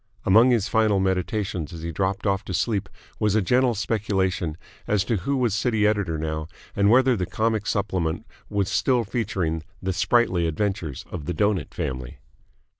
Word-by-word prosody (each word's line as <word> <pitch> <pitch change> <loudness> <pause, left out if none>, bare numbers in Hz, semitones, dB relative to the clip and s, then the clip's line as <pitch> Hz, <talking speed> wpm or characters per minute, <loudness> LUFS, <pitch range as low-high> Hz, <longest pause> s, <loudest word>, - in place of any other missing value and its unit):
Among 110 +6 +6
his 115 -4 +2
final 110 -3 +2
meditations 95 -3 -1
as 80 -2 -8
he 85 - -3
dropped 95 +4 -1
off 100 -1 +1
to 95 - -3
sleep 100 +1 0 0.3
was 105 -1 +2
a - - +5
gentle 125 +4 +3
speculation 95 -6 -1 0.3
as 105 -2 +2
to 110 +2 0
who 135 +10 -1
was 120 -5 +1
City 110 0 +1
editor 100 -6 +1
now 80 0 -3 0.3
and 100 0 +3
whether 130 +2 +5
the 90 -4 -2
comic 110 -2 -1
supplement 95 -2 -1 0.2
was 100 -2 0
still 125 +2 +2
featuring 95 -8 -2 0.2
the 95 0 -2
sprightly 95 -2 +2
adventures 85 -4 -2
of 75 - -5
the 90 - -3
Doughnut 100 +2 0
family. 65 -6 -4
100 Hz, 170 wpm, -24 LUFS, 90-110 Hz, 0.3 s, Among